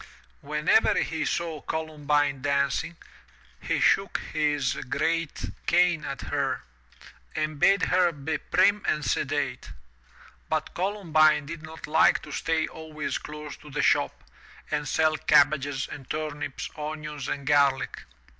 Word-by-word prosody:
Whenever -, -, +2 dB
he -, -, -3 dB
saw 165 Hz, -3 st, -2 dB
Columbine 150 Hz, -3 st, -1 dB
dancing, 140 Hz, +4 st, 0 dB, 0.6 s
he -, -, -1 dB
shook -, -, +3 dB, 0.2 s
his 145 Hz, -4 st, +1 dB, 0.2 s
great 165 Hz, +1 st, -1 dB, 0.2 s
cane 175 Hz, -3 st, +3 dB
at 135 Hz, -, -5 dB
her, -, -, -2 dB, 0.7 s
and 155 Hz, -1 st, -2 dB
bade 195 Hz, +3 st, +4 dB
her 180 Hz, -1 st, +3 dB
be 150 Hz, 0 st, -3 dB
prim 205 Hz, 0 st, +3 dB
and 150 Hz, -2 st, 0 dB
sedate. 135 Hz, -, -1 dB, 0.8 s
But 155 Hz, -1 st, -1 dB
Columbine 160 Hz, -6 st, +2 dB
did 165 Hz, +2 st, -7 dB
not 160 Hz, +1 st, -9 dB
like 160 Hz, +1 st, +4 dB
to -, -, -10 dB
stay 160 Hz, -1 st, 0 dB
always 155 Hz, -2 st, -5 dB
close 150 Hz, 0 st, -8 dB
to 150 Hz, -, -14 dB
the 150 Hz, +1 st, -1 dB
shop -, -, +2 dB, 0.5 s
and 150 Hz, -1 st, -1 dB
sell 155 Hz, +3 st, +2 dB
cabbages 140 Hz, -2 st, +3 dB
and 135 Hz, -3 st, -10 dB
turnips, 150 Hz, -3 st, -4 dB
onions 150 Hz, -2 st, -5 dB
and 140 Hz, -1 st, -4 dB
garlic. 140 Hz, -2 st, +2 dB
150 Hz, 125 wpm, -27 LUFS, 145-160 Hz, 0.8 s, bade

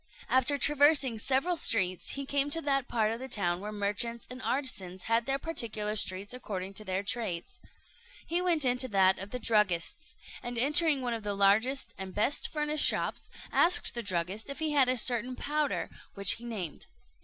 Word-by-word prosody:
After 260 Hz, +2 st, +3 dB
traversing 285 Hz, -4 st, +4 dB
several 275 Hz, +10 st, +1 dB
streets, 185 Hz, -, +1 dB
he 275 Hz, 0 st, -4 dB
came 280 Hz, +1 st, 0 dB
to 330 Hz, +3 st, +2 dB
that 275 Hz, -2 st, +1 dB
part 220 Hz, -2 st, 0 dB
of 230 Hz, -, -4 dB
the 260 Hz, -, -6 dB
town 175 Hz, -8 st, 0 dB
where 210 Hz, +2 st, -6 dB
the 210 Hz, -, -8 dB
merchants 210 Hz, +4 st, -2 dB
and 255 Hz, +1 st, -7 dB
artisans 200 Hz, -11 st, -3 dB
had 230 Hz, +1 st, 0 dB
their 270 Hz, 0 st, +1 dB
particular 220 Hz, -9 st, -2 dB
streets 200 Hz, +1 st, -3 dB
according 195 Hz, -6 st, -6 dB
to 215 Hz, -, -4 dB
their 190 Hz, -1 st, -2 dB
trades. 200 Hz, -6 st, -3 dB, 0.7 s
He 345 Hz, +2 st, 0 dB
went 340 Hz, -5 st, +2 dB
into 250 Hz, +1 st, +2 dB
that 190 Hz, -4 st, +3 dB
of 195 Hz, +2 st, -7 dB
the 250 Hz, -, -4 dB
druggists; 210 Hz, -, 0 dB, 0.3 s
and 240 Hz, 0 st, -5 dB
entering 290 Hz, +2 st, +4 dB
one 245 Hz, -1 st, -1 dB
of 225 Hz, -, -4 dB
the 205 Hz, -1 st, -3 dB
largest 220 Hz, +7 st, +2 dB
and 190 Hz, -1 st, -6 dB
best 220 Hz, +7 st, 0 dB
furnished 300 Hz, -1 st, 0 dB
shops, -, -, 0 dB, 0.2 s
asked 350 Hz, +1 st, +4 dB
the 235 Hz, -, -3 dB
druggist 190 Hz, +3 st, -3 dB
if 280 Hz, -, -5 dB
he 315 Hz, -1 st, -1 dB
had 275 Hz, -4 st, +4 dB
a 255 Hz, -, +1 dB
certain 245 Hz, +1 st, +1 dB
powder, 300 Hz, +2 st, -2 dB, 0.2 s
which 200 Hz, -1 st, +3 dB
he 235 Hz, -, -4 dB
named. 195 Hz, -10 st, -6 dB
235 Hz, 190 wpm, -30 LUFS, 200-275 Hz, 0.7 s, traversing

